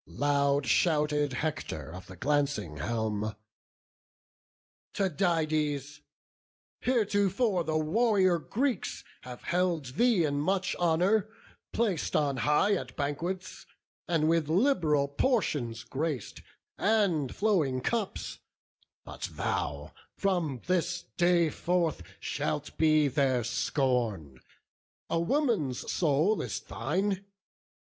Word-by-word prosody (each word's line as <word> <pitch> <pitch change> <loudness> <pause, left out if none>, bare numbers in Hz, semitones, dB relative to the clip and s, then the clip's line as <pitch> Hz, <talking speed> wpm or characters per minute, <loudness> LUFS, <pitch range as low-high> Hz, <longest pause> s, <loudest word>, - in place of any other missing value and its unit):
Loud 140 -1 +1
shouted 150 +1 +2
Hector 130 - -4
of 90 0 -9
the 95 - -10
glancing 140 - 0
helm: 110 +4 -2 1.6
"Tydides, 155 -6 0 0.8
heretofore 205 -4 +1
the 155 0 0
warrior 185 +2 +3
Greeks 245 - -2 0.2
Have 125 -1 -10
held 175 -4 0
thee 235 -7 +4
in 145 -1 -1
much 190 +4 0
honour; 180 +5 +2 0.4
plac'd 205 -9 0
on 140 -3 +1
high 150 - +3
At 195 - -3
banquets, 170 +6 -4 0.4
and 160 -3 +2
with 165 -2 +2
lib'ral 165 - +3
portions 140 - 0
grac'd, 140 +3 -4 0.4
And 195 - +2
flowing 165 -12 +1
cups: 220 - -2 0.7
but - - -6
thou, - - -3 0.2
from 170 - -1
this 180 0 0
day 175 -2 +3
forth, 170 - 0 0.2
Shalt 150 0 -3
be 155 -2 +4
their 135 -3 +1
scorn! 115 - -1 0.7
a 165 - +2
woman's 190 - 0
soul 165 +6 +2
is - - -3
thine! 195 +6 -2
155 Hz, 100 wpm, -29 LUFS, 140-185 Hz, 1.6 s, thee